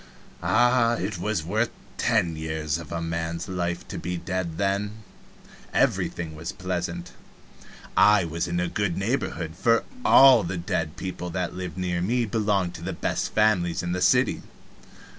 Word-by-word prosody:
Ah, 120 0 +3
it 95 -2 -3
was 105 -3 -1
worth 110 +7 0 0.3
ten 85 -2 +2
years 80 0 -2
of 80 -3 -10
a 85 0 -2
man's 85 +1 -3
life 90 -2 -3
to - - -6
be 90 +1 -3
dead 85 -2 -3
then! 100 +2 -1 0.7
Everything 80 -2 +1
was 80 +2 -5
pleasant. 90 -1 -4 0.8
I 100 +1 +6
was 85 +2 -2
in 85 0 -1
a 90 - 0
good 100 -2 -1
neighborhood, 95 - -2
for 115 +5 +3 0.2
all 130 -4 +8
the 90 +2 -3
dead 85 -2 -2
people 90 -1 -5
that 90 0 -3
lived 90 -3 -6
near 90 -1 -1
me 120 +6 +1
belonged 100 -5 0
to 85 - -9
the 90 +3 -4
best - - -2
families 95 -6 +2
in 85 - -2
the 90 +1 -2
city. - - +3
90 Hz, 160 wpm, -25 LUFS, 85-105 Hz, 0.8 s, all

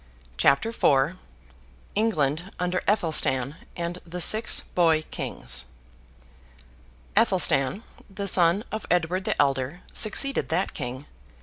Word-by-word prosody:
CHAPTER 140 - +2
IV 150 -6 +1 0.8
ENGLAND 175 -6 0
UNDER 180 0 -1
ATHELSTAN 155 - +2 0.2
AND 175 0 -5
THE 175 +1 -8
SIX 215 +6 +4
BOY 165 -3 +1
KINGS 65 +1 -3 1.5
Athelstan, 135 - +2 0.3
the 200 0 -5
son 180 +2 +3
of 220 0 -5
Edward 180 +2 0
the - - -2
Elder, 135 +5 0
succeeded 275 +6 +2
that 175 +4 -1
king. 130 0 -6
170 Hz, 105 wpm, -25 LUFS, 140-195 Hz, 1.5 s, SIX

